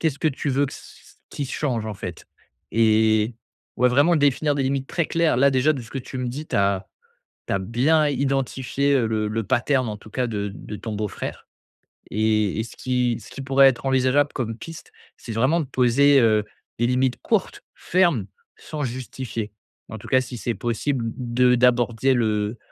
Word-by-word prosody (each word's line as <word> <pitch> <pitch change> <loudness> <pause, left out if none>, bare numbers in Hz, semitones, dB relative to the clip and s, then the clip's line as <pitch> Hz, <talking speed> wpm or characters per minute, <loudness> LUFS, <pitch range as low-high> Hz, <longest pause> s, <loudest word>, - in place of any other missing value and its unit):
qu'est-ce 155 -4 0
que 155 - +2
tu 145 +1 -3
veux 140 +2 +2
que - - -9
c - - -10 0.5
qui 140 - -4
change 125 -6 -2
en 110 - -4
fait 90 -4 -8 0.5
et 110 0 +3 0.4
ouais, 125 +1 +4
vraiment 145 +7 +4
définir 145 +1 +2
des 140 - 0
limites 135 0 -1
très 170 -3 -1
claires. 165 -6 +1
Là 140 +1 +5
déjà 135 +3 +3
de 135 - -5
ce 115 - -13
que 135 - -4
tu 130 +1 -7
me 125 -1 -2
dis, 145 +5 -6
tu - - -2
as 100 -1 +1 0.6
tu - - -1
as - - +1
bien 145 +10 +2
identifié 135 0 0
le 110 -1 -1
le 115 +1 -2
pattern 130 +2 +1
en 105 - -4
tout 110 - -15
cas 125 +1 -1
de 105 -2 -3
de 105 - -8
ton 110 0 -6
beau-frère, 105 -1 -5 0.7
et 110 -1 +1
et - - -2
ce - - -12
qui 125 -2 0
ce - - -13
qui 135 - -7
pourrait 135 +1 +5
être 130 +1 -2
envisageable 130 +2 +2
comme 115 -3 -3
piste, 165 -1 -10 0.2
c'est 115 - -8
vraiment 130 +10 +2
de 145 - -3
poser, 135 +2 +4
heu, 110 -2 +3 0.3
des 120 - +2
limites 125 0 +1
courtes, - - -1
fermes, 170 - +1 0.3
sans 155 -2 -5
justifier. 120 -3 -5 0.4
En 110 - -6
tout - - -12
cas, 130 -1 +4
si 125 0 -8
c'est 120 0 -2
possible 120 +3 -2
de 125 0 +2
d'aborder 120 +1 +3
le 110 -1 0
125 Hz, 195 wpm, -23 LUFS, 110-140 Hz, 0.7 s, Là